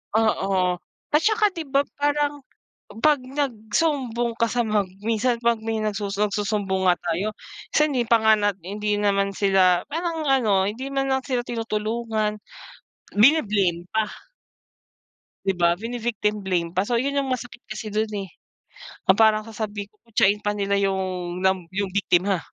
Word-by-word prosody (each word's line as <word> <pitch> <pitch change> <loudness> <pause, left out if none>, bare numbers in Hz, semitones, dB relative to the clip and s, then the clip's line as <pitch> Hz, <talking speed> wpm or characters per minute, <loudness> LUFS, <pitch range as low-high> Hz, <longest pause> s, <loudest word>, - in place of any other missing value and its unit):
Oo 195 -5 +2 0.4
at - - +6
saka 430 0 +3
'di 330 - -3
ba 275 +1 +4 0.2
parang 290 0 +1 0.6
'pag 300 -1 +5
nagsumbong 250 -1 -1
ka 230 - +3
sa 245 - +1
mag 210 -2 +1 0.2
minsan 235 +2 +1
'pag 235 -1 +2
may 225 0 -2
nagsu 210 -1 -2
nagsusumbong 205 -2 0
nga 180 - +6
tayo 175 +5 -2 0.4
minsan 300 - +5
hindi 250 - +2
pa 230 - +5
nga 220 0 +6
na 205 0 +2
hindi 210 +3 -2
naman 200 -1 +2
sila 190 -3 +3
parang 330 +1 -2
ano 225 -8 +3
hindi 255 +5 -6
man 270 0 +1
lang 265 0 +1
sila 250 -3 0
tinutulungan, 220 -1 -2 0.8
bini-blame 205 - +3
pa. 220 0 +2 1.4
'Di 195 - +2
ba 170 0 +5
vini-victim 225 -3 -2
blame 175 -3 0
pa. 185 +2 +2
So 235 +1 +1
yun 280 +2 -1
yung 275 -1 0
masakit 245 -1 -7
kasi 215 0 -6
dun, 215 +1 -1
eh. 195 -2 -4 0.8
Ang - - 0
parang 215 -1 +5
sasabihin 210 -2 -5 0.2
kutsain 210 -2 +3
pa 210 0 -2
nila 200 0 0
yung, 195 -1 +1 0.4
na 190 - +5 0.2
yung 200 -1 -1
biktima. 190 -1 +2
215 Hz, 150 wpm, -24 LUFS, 200-245 Hz, 1.4 s, at